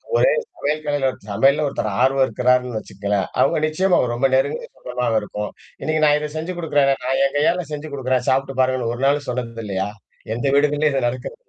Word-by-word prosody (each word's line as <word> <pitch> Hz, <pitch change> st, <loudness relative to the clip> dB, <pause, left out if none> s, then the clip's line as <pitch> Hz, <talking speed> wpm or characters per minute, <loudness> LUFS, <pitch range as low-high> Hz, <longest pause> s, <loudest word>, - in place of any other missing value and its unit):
ஒரே, -, -, +5 dB, 0.3 s
ஒரே 145 Hz, +1 st, +1 dB
கலையில 145 Hz, -2 st, +1 dB
ஒரு -, -, -15 dB
சமையல்ல 135 Hz, +9 st, +3 dB
ஒருத்தர் 125 Hz, -6 st, -2 dB
ஆர்வம் 135 Hz, +1 st, +4 dB
இருக்கிறாருன்னு 125 Hz, 0 st, +1 dB
வச்சுக்கங்களேன்! 100 Hz, -1 st, -2 dB
அவுங்க -, -, +3 dB
நிச்சயமா 180 Hz, +4 st, +2 dB
அவ -, -, +2 dB
ரொம்ப 120 Hz, +3 st, +2 dB
நெருங்குன 135 Hz, +2 st, 0 dB
சொந்தமாக 125 Hz, -3 st, -1 dB
இருக்கும். 105 Hz, 0 st, -5 dB, 0.3 s
இன்னக்கு 155 Hz, 0 st, 0 dB
நான் 150 Hz, -, +5 dB
இத 150 Hz, 0 st, -4 dB
செஞ்சு 170 Hz, +3 st, -4 dB
குடுக்குறேனே, 145 Hz, -5 st, +2 dB
நான் 135 Hz, +1 st, 0 dB
என் 140 Hz, +1 st, -2 dB
கையால 175 Hz, +4 st, +2 dB
செஞ்சு 150 Hz, +1 st, -5 dB
குடுக்குறேன் 130 Hz, -2 st, -1 dB
சாப்புட்டு 135 Hz, 0 st, 0 dB
பாருங்கன்னு 130 Hz, -2 st, +1 dB
ஒரு 130 Hz, -, -5 dB
நாள் 145 Hz, +1 st, +2 dB
சொன்னது 115 Hz, -2 st, -4 dB
இல்லயா! 95 Hz, -1 st, -2 dB, 0.5 s
எந்த 120 Hz, -, -3 dB
வீடு 145 Hz, +1 st, +5 dB
இதுலயும் 150 Hz, 0 st, +1 dB
இது 130 Hz, -3 st, +1 dB
நடக்கிறதில்லயா? 130 Hz, -, -6 dB
135 Hz, 195 wpm, -21 LUFS, 120-150 Hz, 0.5 s, ஒரே